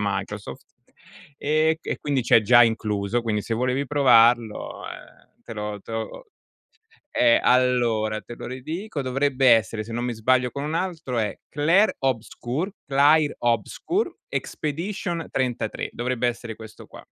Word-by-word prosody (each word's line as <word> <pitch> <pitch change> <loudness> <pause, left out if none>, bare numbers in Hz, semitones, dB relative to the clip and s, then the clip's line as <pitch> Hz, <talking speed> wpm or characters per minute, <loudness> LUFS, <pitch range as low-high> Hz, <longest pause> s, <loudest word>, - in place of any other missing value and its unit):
Microsoft. 100 0 -4 0.7
Ehm, 155 +2 +2
e 160 - 0
qui - - -4
quindi 140 -3 0
c'è 115 - +5
già 120 +3 +6
incluso, 110 0 0
quindi 110 -2 -1
se 115 - -3
volevi 125 +4 0
provarlo, 120 -5 +3
uhm, - - -11
te - - -9
lo 105 -1 -5
te 115 - -11
lo 115 - -5 0.9
eh, 120 -1 +4
allora 120 -4 +2
te 120 - -10
lo - - -8
ridico, 155 - -5
dovrebbe 135 0 +1
essere, 110 -1 +3
se 115 - -10
non 120 +2 -2
mi 125 - -2
sbaglio, 125 +3 +2
con 140 - -5
un 150 +2 -3
altro 165 -9 -3
è 105 -2 -2
Claire 165 +9 +3
Obscure, 130 - -2
Claire 145 +2 +4
Obscure 120 - -1
Expedition 170 +2 -3
33, 125 -4 -2
dovrebbe 125 0 -1
essere 115 -2 -4
questo 110 -1 -12
qua. - - -13
125 Hz, 145 wpm, -24 LUFS, 115-145 Hz, 0.9 s, già